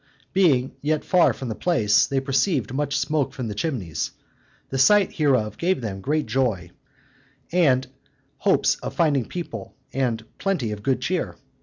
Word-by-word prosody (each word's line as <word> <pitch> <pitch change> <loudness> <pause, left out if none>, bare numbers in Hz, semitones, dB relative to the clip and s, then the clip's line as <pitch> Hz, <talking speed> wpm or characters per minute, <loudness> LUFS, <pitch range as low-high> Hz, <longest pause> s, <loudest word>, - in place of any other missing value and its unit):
Being 140 -9 +3
yet 155 +1 0
far 180 -2 +4
from 130 - -6
the - - -1
place, 110 - +2
they 135 - 0
perceived 135 - 0
much 140 0 -1
smoke 150 0 0
from 125 -3 -4
the - - -3
chimneys: 105 - -2 0.6
the 135 - -1
sight 205 +8 +5
hereof 130 -9 +1
gave 180 0 +1
them 100 -5 -5
great 150 +7 0
joy, 110 -7 -1 0.8
and 140 -7 +3 0.5
hopes - - +2
of - - -7
finding 145 -7 +2
people 115 - -7 0.2
and 120 -4 -1
plenty 175 - -1
of 105 -1 -5
good 130 +3 0
cheer. 175 +7 -2
135 Hz, 155 wpm, -24 LUFS, 115-155 Hz, 0.8 s, sight